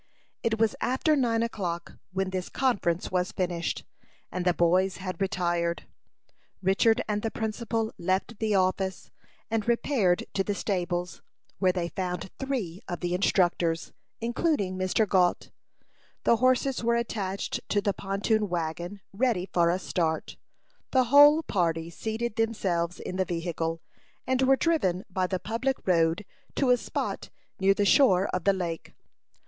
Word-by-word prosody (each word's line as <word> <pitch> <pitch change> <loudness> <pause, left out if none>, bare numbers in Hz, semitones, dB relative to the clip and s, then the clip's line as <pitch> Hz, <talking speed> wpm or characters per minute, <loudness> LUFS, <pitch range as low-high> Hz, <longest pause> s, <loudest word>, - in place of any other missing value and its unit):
It 225 -1 0
was 225 +3 +2
after 285 +5 +2
nine 230 -4 +2
o'clock 180 -7 -4
when 190 0 -1
this 185 -1 -3
conference 200 -10 0
was 180 0 0
finished, 175 -2 -2 0.5
and 180 0 -3
the 180 - +5
boys 180 +2 +2
had 185 -2 -6
retired. 175 -3 0 0.7
Richard 195 +4 +3
and 210 -1 -1
the 225 - -1
principal 220 0 -2
left 190 +5 -1
the 215 -2 +1
office, 190 0 0 0.4
and 225 -1 0
repaired 235 -6 +2
to 195 - +1
the 205 +1 -2
stables, 180 -3 -2 0.4
where 185 -2 +4
they 180 -2 -2
found 180 0 -4
three 230 -10 -3
of 175 - -5
the 175 -1 -1
instructors, 175 -3 +1 0.3
including 235 - 0
Mr. 185 +4 +1
Gault. 180 -2 +2 0.7
The 235 - +4
horses 255 +1 +2
were 235 0 +2
attached 200 -5 -2
to 205 - +2
the 200 0 0
pontoon 205 +2 0
wagon, 175 +3 -3
ready 220 -4 +1
for 170 -1 +4
a 175 - +2
start. 165 -3 -2 0.5
The 260 -1 +4
whole 295 +3 +8
party 165 - -1
seated 220 +5 -3
themselves 185 -7 0
in 185 - -5
the 190 - +2
vehicle, 165 -1 -3 0.4
and 260 0 +1
were 265 +1 +5
driven 200 - +1
by 185 0 0
the 185 - -1
public 230 +7 -1
road 170 +2 +2 0.3
to 265 -3 +3
a 250 - +5
spot - - -4 0.3
near 195 +1 +4
the 205 - +1
shore 195 -4 +5
of 180 -2 -2
the 200 - +5
lake. 170 -3 -4
190 Hz, 150 wpm, -27 LUFS, 180-225 Hz, 0.7 s, whole